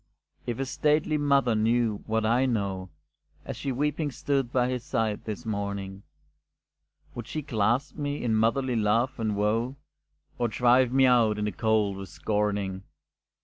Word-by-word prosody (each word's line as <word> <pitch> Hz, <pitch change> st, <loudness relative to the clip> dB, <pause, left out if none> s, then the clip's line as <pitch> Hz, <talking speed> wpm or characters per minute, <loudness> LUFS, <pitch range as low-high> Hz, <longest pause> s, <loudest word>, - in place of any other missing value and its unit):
If 120 Hz, -2 st, -2 dB
his 135 Hz, -1 st, -3 dB
stately 150 Hz, 0 st, +1 dB
mother 140 Hz, -4 st, +3 dB
knew 110 Hz, -1 st, +1 dB
what 110 Hz, 0 st, 0 dB
I 120 Hz, +4 st, +3 dB
know, 100 Hz, -6 st, -2 dB, 0.6 s
As -, -, -5 dB
she 140 Hz, -, -3 dB
weeping 150 Hz, +3 st, -1 dB
stood 135 Hz, -2 st, -1 dB
by 125 Hz, -1 st, +2 dB
his 125 Hz, -2 st, -3 dB
side 110 Hz, -5 st, -2 dB
this 110 Hz, 0 st, -5 dB
morning, 100 Hz, -2 st, -4 dB, 1.1 s
Would 120 Hz, -2 st, -7 dB
she 155 Hz, -, -4 dB
clasp 120 Hz, +2 st, 0 dB
me 145 Hz, -2 st, -3 dB
in 115 Hz, -2 st, +1 dB
motherly 120 Hz, +4 st, +1 dB
love 115 Hz, +4 st, +1 dB
and 110 Hz, -2 st, -1 dB
woe 115 Hz, +5 st, 0 dB, 0.6 s
Or 120 Hz, -, +2 dB
drive 125 Hz, +2 st, +3 dB
me 135 Hz, 0 st, +4 dB
out 115 Hz, -4 st, +4 dB
in 105 Hz, -, -1 dB
the 105 Hz, -, -1 dB
cold 110 Hz, -3 st, +1 dB
with 95 Hz, -1 st, -8 dB
scorning? 100 Hz, -1 st, -1 dB
115 Hz, 155 wpm, -27 LUFS, 105-130 Hz, 1.1 s, me